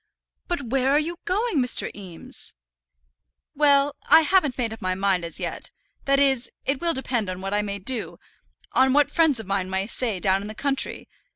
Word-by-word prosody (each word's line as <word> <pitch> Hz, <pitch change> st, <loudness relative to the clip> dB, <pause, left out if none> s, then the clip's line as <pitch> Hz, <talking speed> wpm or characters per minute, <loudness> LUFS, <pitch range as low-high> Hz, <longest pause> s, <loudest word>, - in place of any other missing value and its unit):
"But 345 Hz, -5 st, -2 dB
where 260 Hz, +2 st, 0 dB
are -, -, +5 dB
you 335 Hz, +3 st, -4 dB
going, 420 Hz, +1 st, 0 dB
Mr. 250 Hz, -1 st, 0 dB
Eames?" 185 Hz, -5 st, -10 dB, 1.0 s
"Well; 285 Hz, -1 st, +3 dB
I 325 Hz, -, +8 dB
haven't 320 Hz, -4 st, +2 dB
just -, -, -23 dB
made 230 Hz, -3 st, -1 dB
up 225 Hz, -, -11 dB
my 185 Hz, 0 st, -1 dB
mind 190 Hz, -2 st, +1 dB
as 170 Hz, -, -5 dB
yet. -, -, -5 dB, 0.4 s
That 275 Hz, 0 st, +4 dB
is, 270 Hz, -3 st, +2 dB, 0.2 s
it 270 Hz, 0 st, -1 dB
will 335 Hz, -1 st, +1 dB
depend 245 Hz, -6 st, -1 dB
on 185 Hz, 0 st, -5 dB
what 195 Hz, +1 st, -4 dB
I 205 Hz, -, +2 dB
may 200 Hz, -1 st, -4 dB
do, 225 Hz, +4 st, -2 dB, 0.5 s
on 260 Hz, 0 st, +3 dB
what 290 Hz, 0 st, +3 dB
friends 320 Hz, -7 st, +3 dB
of 220 Hz, -, -7 dB
mine 195 Hz, -1 st, -2 dB
may 190 Hz, +1 st, -1 dB
say 225 Hz, -3 st, -1 dB
down 190 Hz, +1 st, +2 dB
in 205 Hz, -, -7 dB
the 215 Hz, -, -8 dB
country. 275 Hz, +3 st, 0 dB
255 Hz, 200 wpm, -24 LUFS, 200-285 Hz, 1.0 s, I